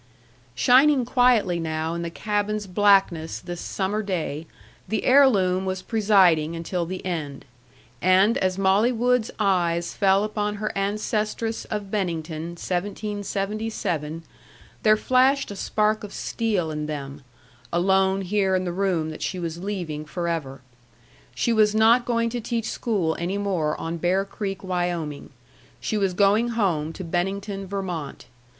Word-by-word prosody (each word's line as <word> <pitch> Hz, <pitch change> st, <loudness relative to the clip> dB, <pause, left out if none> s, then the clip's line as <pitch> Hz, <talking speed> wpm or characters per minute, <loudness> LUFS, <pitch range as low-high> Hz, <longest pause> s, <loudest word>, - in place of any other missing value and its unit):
Shining 255 Hz, -, +5 dB
quietly 240 Hz, -8 st, +3 dB
now 160 Hz, 0 st, -2 dB
in 170 Hz, -, -3 dB
the 170 Hz, -, -3 dB
cabin's 210 Hz, +3 st, -2 dB
blackness 190 Hz, -4 st, +2 dB
this 175 Hz, -1 st, -7 dB
summer 200 Hz, +2 st, -2 dB
day, 165 Hz, -6 st, -3 dB, 0.4 s
the 220 Hz, -1 st, -1 dB
heirloom 200 Hz, -9 st, +4 dB
was 185 Hz, -1 st, -3 dB
presiding 185 Hz, -8 st, +3 dB
until 170 Hz, +1 st, -3 dB
the 185 Hz, +1 st, -6 dB
end. 155 Hz, -6 st, -4 dB, 0.6 s
And 190 Hz, +5 st, +4 dB
as 185 Hz, 0 st, 0 dB
Molly 195 Hz, +5 st, +3 dB
Wood's 245 Hz, -1 st, +1 dB
eyes 175 Hz, -4 st, +1 dB
fell 195 Hz, 0 st, +3 dB
upon 210 Hz, -1 st, -2 dB
her 215 Hz, +1 st, -4 dB
ancestress 215 Hz, +2 st, -2 dB
of 205 Hz, -2 st, -5 dB
Bennington, 170 Hz, -4 st, -3 dB
1777, 200 Hz, -4 st, -3 dB, 0.6 s
there 215 Hz, 0 st, +5 dB
flashed 260 Hz, +2 st, +2 dB
a -, -, -6 dB
spark 215 Hz, +2 st, 0 dB
of 205 Hz, -, -8 dB
steel 205 Hz, -8 st, -1 dB
in 150 Hz, 0 st, -4 dB
them, 140 Hz, -1 st, -6 dB, 0.5 s
alone 190 Hz, +2 st, +2 dB
here 190 Hz, 0 st, +1 dB
in 185 Hz, 0 st, 0 dB
the 175 Hz, -, -2 dB
room 175 Hz, -4 st, 0 dB
that 155 Hz, -, -9 dB
she 185 Hz, -, -2 dB
was 170 Hz, -1 st, -4 dB
leaving 175 Hz, -7 st, -4 dB
forever. 155 Hz, -5 st, -3 dB, 0.7 s
She 230 Hz, -, +1 dB
was 215 Hz, -1 st, +3 dB
not 230 Hz, +3 st, +5 dB
going 230 Hz, -1 st, 0 dB
to 240 Hz, 0 st, -3 dB
teach 230 Hz, 0 st, -2 dB
school 190 Hz, -9 st, -1 dB
any 180 Hz, +4 st, -2 dB
more 180 Hz, -7 st, -1 dB
on 165 Hz, +1 st, -4 dB
Bear 185 Hz, +4 st, +1 dB
Creek, 195 Hz, -1 st, -5 dB
Wyoming; 175 Hz, -5 st, -3 dB, 0.5 s
she -, -, -3 dB
was 195 Hz, -3 st, 0 dB
going 205 Hz, +4 st, +3 dB
home 165 Hz, -8 st, 0 dB
to 190 Hz, -, -7 dB
Bennington, 195 Hz, +3 st, -3 dB
Vermont. 180 Hz, -7 st, -5 dB
195 Hz, 140 wpm, -24 LUFS, 170-215 Hz, 0.7 s, Shining